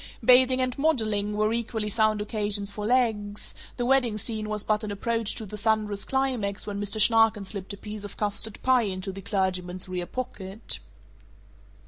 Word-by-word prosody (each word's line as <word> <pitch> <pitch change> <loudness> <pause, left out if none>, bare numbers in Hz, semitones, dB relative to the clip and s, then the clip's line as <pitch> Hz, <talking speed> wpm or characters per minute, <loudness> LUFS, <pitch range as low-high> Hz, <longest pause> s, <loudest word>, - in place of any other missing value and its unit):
Bathing 255 +1 +6
and 255 -1 -1
modeling 215 -8 +1
were 215 +1 +2
equally 230 -2 -2
sound 215 0 +2
occasions 205 -1 -1
for 210 +1 -4
legs; 220 -4 0 0.2
the 245 - -1
wedding 250 -4 +3
scene 215 0 -3
was 210 -1 0
but 215 0 0
an 215 - -3
approach 225 +2 -1
to 225 - -5
the 210 +1 -8
thunderous 215 -2 0
climax 255 -7 -1
when 200 -1 -4
Mr. 205 +2 0
Schnarken 225 -1 +5
slipped 195 -1 -6
a - - -8
piece 210 +1 -7
of 205 - -9
custard 210 +1 -1
pie 260 -1 +4
into 195 -2 -3
the 195 +1 -8
clergyman's 185 -2 -2
rear 180 -1 -4
pocket. 215 -5 -5
215 Hz, 170 wpm, -26 LUFS, 200-230 Hz, 0.2 s, Bathing